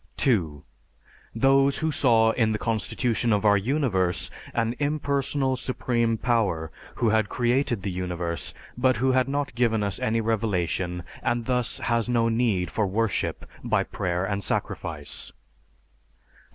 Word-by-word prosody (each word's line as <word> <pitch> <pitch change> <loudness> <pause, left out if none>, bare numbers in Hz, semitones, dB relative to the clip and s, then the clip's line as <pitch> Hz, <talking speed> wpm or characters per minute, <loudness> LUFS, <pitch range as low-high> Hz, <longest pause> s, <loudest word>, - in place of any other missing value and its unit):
(2) 85 - +1 0.7
Those 135 +3 +4
who 160 0 0
saw 115 -6 +4
in 110 -2 +1
the - - 0
constitution 115 +2 0
of 105 0 +1
our 105 -1 +6
universe 100 -6 0 0.2
an 115 0 0
impersonal 140 -2 0
Supreme 120 -3 0
Power, 100 -10 0 0.2
who 115 - +1
had 110 -1 +2
created 120 -3 0
the 100 - -2
universe, 90 -2 -4 0.2
but 130 -1 +2
who 130 +4 +2
had 130 0 +2
not 140 -1 -2
given 115 -3 +1
us 100 -2 -2
any 115 +1 +1
revelation, 95 -5 -1 0.2
and 120 -1 -1
thus 125 -2 0
has 115 0 0
no 115 -1 +2
need 110 -7 +1
for 105 -3 0
worship 110 +2 -1 0.2
by - - +1
prayer 90 +1 -2
and 100 0 -2
sacrifice. 75 -4 -3
115 Hz, 140 wpm, -25 LUFS, 100-125 Hz, 0.7 s, our